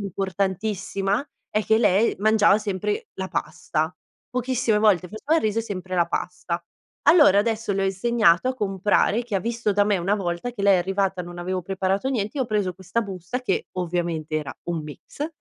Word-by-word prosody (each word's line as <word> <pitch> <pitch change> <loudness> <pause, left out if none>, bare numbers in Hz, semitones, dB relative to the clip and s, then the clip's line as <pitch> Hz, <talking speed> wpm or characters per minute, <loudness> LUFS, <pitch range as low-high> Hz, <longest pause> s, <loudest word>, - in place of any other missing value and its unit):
importantissima 195 +2 -1 0.3
è 215 +1 +1
che 220 - +3
lei 210 0 +3
mangiava 210 -1 +5
sempre 205 -1 -2
la 190 - -3
pasta. 160 0 -2 0.4
Pochissime 250 -3 +1
volte 200 -4 +3
faceva 215 - -1
il - - +1
riso 215 +1 0
e - - 0
sempre 185 -3 -5
la 175 -1 +3
pasta. 175 -1 -3 0.4
Allora 295 - +6
adesso 225 -1 -1
le 195 - 0
ho - - +2
insegnato 195 +1 +3
a 260 - -1
comprare 205 +1 +1
che 230 -4 -6
ha 195 - +2
visto 230 -1 -1
da 205 0 +4
me 205 -2 +2
una 190 +4 +1
volta 175 +2 -2
che 225 -5 -6
lei 200 -1 +6
è - - +2
arrivata 190 +1 0
e - - -5
non 175 0 -9
avevo 185 +1 -2
preparato 195 +5 -1
niente, 235 +1 -2
io 260 - +2
ho - - -10
preso 205 -4 0
questa 190 +5 -2
busta 195 +3 -5
che 200 -7 -1
ovviamente 170 -3 -2
era 150 -2 -4
un 165 -2 -2
mix 155 - -7
200 Hz, 195 wpm, -24 LUFS, 180-220 Hz, 0.4 s, Allora